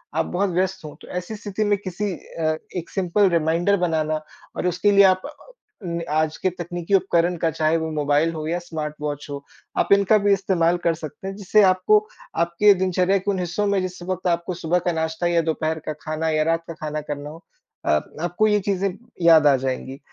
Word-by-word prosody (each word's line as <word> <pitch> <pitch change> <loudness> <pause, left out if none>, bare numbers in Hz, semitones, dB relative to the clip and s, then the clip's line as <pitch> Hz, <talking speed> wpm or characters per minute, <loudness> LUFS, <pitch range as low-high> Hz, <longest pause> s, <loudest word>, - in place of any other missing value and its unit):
आप 160 0 +1
बहुत 195 +3 -1
व्यस्त 190 +1 -1
हो। 150 - -9
तो - - -13
ऐसी 180 +4 -5
स्थिति 210 0 -3
में 205 -1 +2
किसी 195 +2 -3
अ, 155 -1 -3 0.2
1 170 - -5
सिंपल 195 +1 +2
रिमाइंडर 170 +4 +2
बनाना 155 -1 -1 0.3
और - - -1
उसके 180 +4 +2
लिए 200 0 +7
आप 185 0 -1
अ, - - -6 0.5
नि 170 -1 -3
आज 155 +1 0
के 185 - 0
तकनीकी 175 +1 -5
उपकरण 180 -2 +2
का 165 0 +1
चाहे 160 +1 +1
वो 160 0 -3
मोबाइल 150 +1 +1
हो 155 -1 -5
या 170 +2 -1
स्मार्ट 160 -3 -5
वॉच 145 -1 -4
हो, 140 0 -6 0.3
आप - - +1
इनका 200 +2 +4
भी 205 -1 +3
इस्तेमाल 175 -3 +1
कर 170 - +4
सकते 155 +3 -8
हैं, 195 - -5
जिससे 210 +1 +3
आपको 185 +3 +4 0.4
आपके 170 +5 +4
दिनचर्या 185 0 +1
के 195 +2 -1
उन 190 - -2
हिस्सों 180 +4 -1
में 200 -1 +2
जिस 185 0 -5
वक़्त 185 0 -3
आपको 170 +1 0
सुबह 175 0 0
का - - +3
नाश्ता 160 +1 -1
या 170 -1 +3
दोपहर 160 0 -1
का 155 - -1
खाना 155 +1 -2
या 155 -1 +2
रात 165 +1 0
का 165 - -6
खाना 155 -1 -4
करना 145 0 -6
हो 165 +3 -12 0.4
अ, - - -1 0.3
आपको 175 +5 +1
ये 210 -1 +3
चीज़ें 195 0 +1 0.3
याद 165 -3 +6
आ 140 - +6
जाएँगी। 130 +1 -4
170 Hz, 210 wpm, -23 LUFS, 160-190 Hz, 0.5 s, लिए